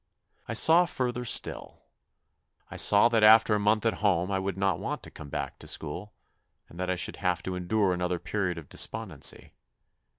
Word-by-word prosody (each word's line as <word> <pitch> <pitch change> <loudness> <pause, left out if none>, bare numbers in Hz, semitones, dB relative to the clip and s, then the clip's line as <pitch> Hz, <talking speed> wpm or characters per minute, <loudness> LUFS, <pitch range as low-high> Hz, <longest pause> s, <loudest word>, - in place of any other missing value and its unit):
I 115 - -4
saw 165 +9 +5
further 125 -5 -3
still. 120 - -2 0.9
I - - -8
saw 105 +2 +5
that 115 -2 +1
after 110 0 +6
a 105 - +1
month 105 +2 +1
at 115 - +2
home 95 -2 +1
I 95 - 0
would 95 -1 -4
not 95 -1 0
want - - -5
to - - -10
come 75 - -11
back - - -5
to - - -12
school, 90 +7 -5 0.5
and 85 - -14
that 90 0 -3
I 90 - 0
should 90 - -4
have 90 -3 -1
to 95 - -4
endure 90 +2 0
another 90 0 -2
period 90 -1 -3
of 80 -3 -9
despondency. - - -2
100 Hz, 190 wpm, -27 LUFS, 90-110 Hz, 0.9 s, after